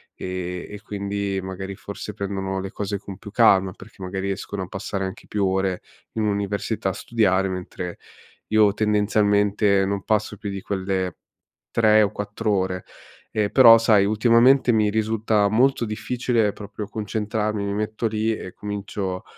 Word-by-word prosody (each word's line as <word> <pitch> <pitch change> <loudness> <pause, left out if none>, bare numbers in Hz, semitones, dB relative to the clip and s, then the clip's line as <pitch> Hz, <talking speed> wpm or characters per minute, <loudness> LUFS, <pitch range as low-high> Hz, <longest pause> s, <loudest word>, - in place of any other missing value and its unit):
e 90 -1 -5
e 105 0 -9
quindi 100 -1 -3
magari, 95 +1 -6
forse, 100 +2 -7
prendono 95 -1 -3
le 95 +1 -6
cose 100 0 -3
con 100 -2 -9
più 105 - -10
calma, 95 -5 +4
perché 100 -2 -15
magari 95 +1 -3
riescono 95 0 -4
a 90 - -7
passare 95 0 -4
anche 95 +4 -8
più 100 -2 0
ore 95 -1 0 0.3
in 110 - -1
università 100 0 -1
a - - -3
studiare, 95 -4 +1
mentre 90 -1 -5 0.5
io, 105 -2 +4
tendenzialmente, 105 -1 +2
non 100 0 -2
passo 105 -1 0
più 100 - -5
di 100 -1 -5
quelle 95 -2 -2 0.5
3 110 -1 +5
o 100 - 0
4 105 +1 -3
ore. 95 -2 0 0.5
E 105 -2 0
però, 115 -4 +9
sai, 110 -3 +4
ultimamente 120 +5 +4
mi 110 -2 +3
risulta 110 -1 +1
molto 125 +2 +3
difficile 115 0 0
proprio 105 0 -7
concentrarmi, 105 0 -2
mi 100 - -2
metto 110 +2 -2
lì 110 0 0
e 95 - -8
comincio, 100 -2 -4
100 Hz, 155 wpm, -23 LUFS, 95-110 Hz, 0.5 s, però